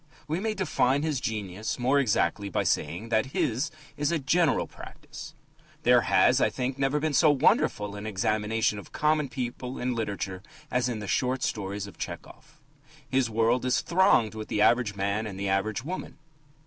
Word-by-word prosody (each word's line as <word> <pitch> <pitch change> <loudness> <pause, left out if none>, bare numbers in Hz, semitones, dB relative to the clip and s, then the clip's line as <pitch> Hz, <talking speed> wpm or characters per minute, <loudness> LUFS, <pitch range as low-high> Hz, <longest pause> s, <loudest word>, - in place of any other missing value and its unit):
We 160 +3 -1
may 215 +2 -2
define 145 -7 +1
his 155 -4 0
genius 105 -2 -3
more 130 +3 +2
exactly 100 -5 +1
by - - 0
saying 85 +10 -1
that 110 +1 +2
his 130 +7 0 0.3
is 145 +2 0
a 170 - +2
general 155 +1 +2
practice. - - -11 0.5
There - - +5
has, - - +4
I - - +4
think, 130 +1 -3
never 140 +2 +1
been 155 0 -1
so 155 +2 +5
wonderful 105 -7 +2
an 105 +1 -6
examination 105 +1 0
of - - -13
common 150 -2 +1
people 125 0 -5
in 125 0 -1
literature 100 -4 -3 0.3
as 125 0 +1
in 110 -3 -4
the 105 - -6
short 125 +7 0
stories 100 -1 -3
of 100 - -13
Tchehov. - - -8 0.5
His 130 -2 +1
world 115 +3 +2
is 125 0 +1
thronged 170 - +3
with 110 -1 -6
the - - -2
average 115 -1 +3
man 100 +2 -1
and 100 -2 -7
the 100 0 -1
average 100 +3 0
woman. 180 +6 -6
120 Hz, 175 wpm, -27 LUFS, 105-135 Hz, 0.5 s, There